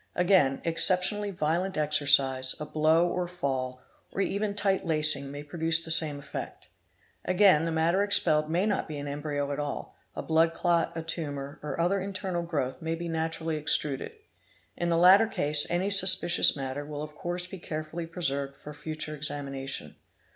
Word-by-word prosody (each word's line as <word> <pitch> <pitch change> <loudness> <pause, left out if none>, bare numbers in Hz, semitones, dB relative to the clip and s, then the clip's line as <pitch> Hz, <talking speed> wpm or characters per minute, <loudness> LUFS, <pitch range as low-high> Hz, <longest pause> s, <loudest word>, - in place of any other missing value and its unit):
Again, 180 -7 +2
exceptionally 185 +5 +2
violent 175 +1 -2
exercise, 140 -3 +2
a 150 - -5
blow 155 +3 +2
or 180 0 -3
fall, 130 -7 -4 0.3
or - - -7
even 200 +1 -2
tight 195 -2 +1
lacing, 155 -3 +1
may 145 +1 -8
produce 165 +2 +2
the 160 - +1
same 155 -3 +6
effect. 140 0 -8 0.5
Again 185 -4 +3
the 165 - -2
matter 165 +4 +1
expelled 155 -7 +3
may 175 +5 0
not 210 -2 -1
be 155 -2 -7
an 145 0 -6
embryo 145 0 -4
at 140 - -4
all; 145 -1 -6 0.2
a. - - -5
blood 165 +1 +1
clot, 170 -1 0
a 165 - -4
tumour, 145 -4 -5
or 150 +2 -6
other 180 +4 +1
internal 190 -2 -4
growth 140 -6 -4
may 165 0 -3
be 170 +1 -6
naturally 160 0 -3
extruded. 150 - -1 0.6
In 175 - -3
the 165 - +1
latter 190 +6 +6
case 150 -7 +2
any 180 +4 -1
suspicious 190 -5 +5
matter 135 +1 -5
will 150 0 -7
of 155 0 -9
course 175 +3 -3
be 185 +1 -10
carefully 160 +1 -6
preserved 140 -5 -3
for 150 - -11
future 155 +1 -6
examination. 140 - -5
160 Hz, 170 wpm, -27 LUFS, 145-175 Hz, 0.6 s, same